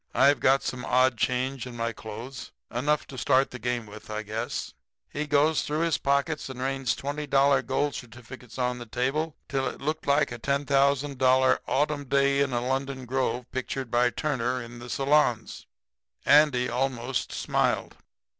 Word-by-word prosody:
I've 140 +1 +5
got 135 +1 +3
some 125 -1 -4
odd 130 0 +3
change 130 +2 -1
in 125 - -9
my 115 0 -1
clothes 115 +5 -8 0.2
enough 145 +5 0
to 130 - -8
start 135 +1 +3
the 125 - -7
game 120 0 -2
with, 105 +1 -12
I 110 0 -3
guess.' 110 +2 -4 0.3
"He 150 +1 -4
goes 150 +2 +3
through 150 +2 -2
his 165 -2 +1
pockets 140 +2 0
and 130 -1 -8
rains 135 -1 -1
$20 145 +2 -4 0.4
gold 140 +2 0
certificates 120 0 -10
on 125 -1 -1
the 120 - -8
table 140 +7 -1
till 135 -1 -1
it - - -6
looked 155 +3 -3
like 140 -1 +3
a 120 - -6
$10,000 140 -1 +2
'Autumn 145 0 0
Day 140 +1 +2
in 140 -1 +1
a 120 0 -1
Lemon 135 0 -2
Grove' 125 -1 -1
picture 130 +1 -3
by 120 +1 +2
Turner 125 -3 -1
in 120 0 -9
the 120 +1 -9
salons. 135 -5 +1 0.6
Andy 140 -4 +5
almost 125 0 -2
smiled. - - 0
130 Hz, 165 wpm, -27 LUFS, 125-140 Hz, 0.6 s, I've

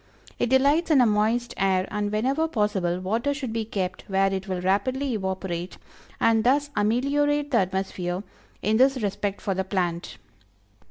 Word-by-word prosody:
It - - +1
delights 280 +6 +3
in 300 -4 +5
a 250 - +6
moist 220 +3 +1
air, 190 -1 +1
and 210 -1 -2
whenever 265 +9 +1
possible, 205 - 0
water 230 +10 -1
should 260 -6 -4
be 225 -1 -2
kept 190 -4 -3
where 195 0 +2
it 195 +1 -4
will 185 -1 -2
rapidly 250 +9 0
evaporate, 190 -3 -3 0.4
and 225 -1 +3
thus 285 +4 +2
ameliorate 285 +7 +1
the 235 - +4
atmosphere 185 -1 -2 0.4
in 215 +1 +2
this 265 +2 +4
respect 200 0 -2
for 195 - -1
the 190 +1 -1
plant. 180 -3 -2
210 Hz, 160 wpm, -25 LUFS, 190-260 Hz, 0.4 s, a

